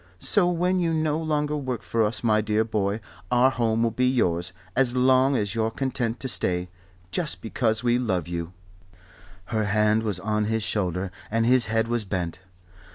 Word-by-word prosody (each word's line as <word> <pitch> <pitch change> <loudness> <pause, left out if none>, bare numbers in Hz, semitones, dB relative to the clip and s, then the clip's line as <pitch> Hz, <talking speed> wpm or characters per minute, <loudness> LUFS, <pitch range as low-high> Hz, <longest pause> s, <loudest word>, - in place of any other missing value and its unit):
So 180 - +3
when 180 +2 +1
you 165 -2 0
no 155 -1 0
longer 150 -2 -1
work 130 -4 -4
for 115 -1 0
us, 110 +2 -1
my 110 -2 +3
dear 105 +1 +1
boy, 105 -1 -2 0.3
our 125 +2 +4
home 115 -2 0
will 115 - +1
be 125 +3 +1
yours, 90 -9 0 0.2
as 125 -1 +3
long 130 +2 +4
as 105 -4 -1
you're 110 -1 0
content 125 -1 -2
to 130 - -2
stay, 90 -7 +1 0.4
just 170 -4 0
because 110 0 0
we 120 0 +2
love 95 -10 -1
you." 85 -1 -4 1.0
Her 110 -1 +1
hand 105 +1 +2
was 105 -5 -2
on 105 +2 -1
his 110 0 -1
shoulder 95 -3 -1 0.2
and 115 +1 +1
his 125 -1 +5
head 110 +1 0
was 120 -1 0
bent. 90 -3 -4
115 Hz, 180 wpm, -25 LUFS, 105-130 Hz, 1.0 s, his